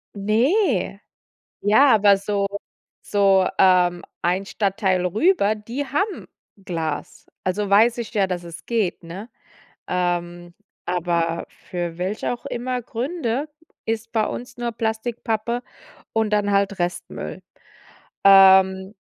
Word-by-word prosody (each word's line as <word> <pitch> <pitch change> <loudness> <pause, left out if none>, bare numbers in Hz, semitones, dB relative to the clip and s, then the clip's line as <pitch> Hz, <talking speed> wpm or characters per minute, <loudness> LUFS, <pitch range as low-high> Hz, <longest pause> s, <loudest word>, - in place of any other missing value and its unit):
Ne. 220 - +1 0.6
Ja, 235 +6 +5
aber 200 -2 +5
so 200 0 -1 0.6
so, 195 -2 +3
ähm, 180 -2 +4 0.2
ein 185 +3 0
Stadtteil 190 -3 0
rüber, 215 - +2
die 235 +7 -5
haben 385 +10 -2 0.4
Glas. 160 -4 -4 0.2
Also, 200 +2 -1
weiß 225 +4 +4
ich 230 - -6
ja, 200 -3 +2
dass 175 -1 -4
es 165 -3 -10
geht, 220 -8 -1
ne? 185 +7 -8 0.6
Ähm, 175 -1 -2 0.3
aber 170 -1 -1 0.2
für 175 -2 -4
welche 190 +6 -2
auch 240 - -10
immer 250 +1 -3
Gründe 255 +2 -3 0.4
ist 225 0 -3
bei 220 -2 +1
uns 245 +2 -6
nur 240 -1 -2
Plastik, 225 +1 -3
Pappe 235 +2 -1 0.5
und 220 -1 0
dann 205 -1 +1
halt 200 -1 +1
Restmüll. 175 0 -4 0.8
Ähm. 190 0 +6
200 Hz, 120 wpm, -22 LUFS, 180-230 Hz, 0.8 s, Ähm